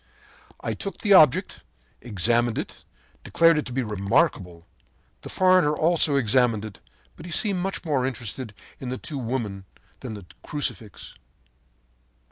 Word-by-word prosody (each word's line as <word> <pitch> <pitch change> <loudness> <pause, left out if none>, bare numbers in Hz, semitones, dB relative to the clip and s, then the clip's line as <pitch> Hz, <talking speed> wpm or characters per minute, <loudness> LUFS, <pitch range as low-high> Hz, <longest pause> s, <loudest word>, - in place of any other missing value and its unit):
“I - - -3
took 195 -4 -5
the 205 -2 +2
object, 155 -8 +5 0.4
examined 120 +2 0
it - - -4
and - - -31
declared 165 -2 +3
it 150 - -5
to - - -8
be 130 +1 -1
remarkable. 100 - -1 0.6
The - - -9
foreigner 185 -5 +3
also 160 -2 +3
examined 115 -3 +2
it, 105 -3 -10 0.4
but 160 - -11
he - - -8
seemed 195 +2 +1
much 190 0 -4
more 145 -5 0
interested 120 -2 -6 0.2
in 130 - -6
the 130 - -4
two 145 0 -6
women 110 -6 -4 0.3
than 125 -4 -7
in - - -7
the 100 -3 -11 0.2
crucifix. 130 -8 -4
130 Hz, 150 wpm, -24 LUFS, 110-160 Hz, 0.6 s, object